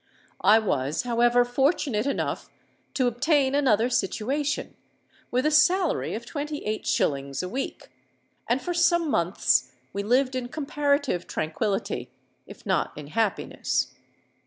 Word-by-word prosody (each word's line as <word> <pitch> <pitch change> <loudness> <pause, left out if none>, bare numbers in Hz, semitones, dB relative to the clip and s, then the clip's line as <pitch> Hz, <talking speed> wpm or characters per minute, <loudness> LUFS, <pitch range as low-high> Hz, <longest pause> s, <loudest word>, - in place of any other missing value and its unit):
I 210 +3 +7
was, 145 -10 0
however, 240 0 +3
fortunate 265 -2 +1
enough 280 - -2 0.5
to 260 - +2
obtain 270 +3 +2
another 245 -6 +3
situation, 265 +7 -1 0.5
with 255 +3 0
a 305 - +3
salary 350 +3 +3
of 230 +2 -6
twenty 295 +1 -5
eight 215 0 -3
shillings 140 +1 0
a - - -3
week; 260 +8 -5 0.6
and 240 +3 +2
for 355 - -2
some 340 -2 +2
months 175 -1 +2 0.2
we 200 - -2
lived 255 +5 +2
in 255 -1 -3
comparative 285 - -1
tranquillity—if 195 +6 -4
not - - 0
in 150 -1 -8
happiness. 220 +5 -1
245 Hz, 125 wpm, -26 LUFS, 210-290 Hz, 0.6 s, I